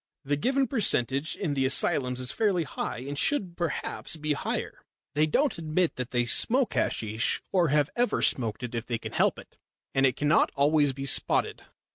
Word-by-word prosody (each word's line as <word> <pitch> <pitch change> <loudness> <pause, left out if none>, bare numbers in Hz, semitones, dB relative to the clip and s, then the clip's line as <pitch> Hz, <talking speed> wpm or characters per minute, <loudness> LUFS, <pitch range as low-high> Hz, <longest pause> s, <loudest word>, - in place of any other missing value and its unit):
The 145 +1 +1
given 265 - +1
percentage 150 - 0
in 170 -8 -2
the 135 -1 0
asylums 130 -1 +1
is 125 -1 -1
fairly 200 -6 +1
high, 125 -4 -5
and 145 - -4
should 185 - -1
perhaps 170 -2 -4
be 150 -1 -1
higher. - - -4 0.3
They 150 +2 +2
don't 280 - +1
admit 165 +2 0
that 125 -1 -3
they 120 -1 0
smoke 245 - +3
hasheesh 110 +2 0
or 180 -3 +3
have 150 0 +1
ever 245 0 +1
smoked 115 -2 +1
it 125 - -5
if 115 0 -4
they 120 - -1
can - - -8
help - - +1
it, - - -15 0.3
and 135 - +2
it 130 - -1
cannot 150 +3 +3
always 145 0 +3
be 135 +1 -6
spotted." - - 0
145 Hz, 185 wpm, -27 LUFS, 130-175 Hz, 0.3 s, smoke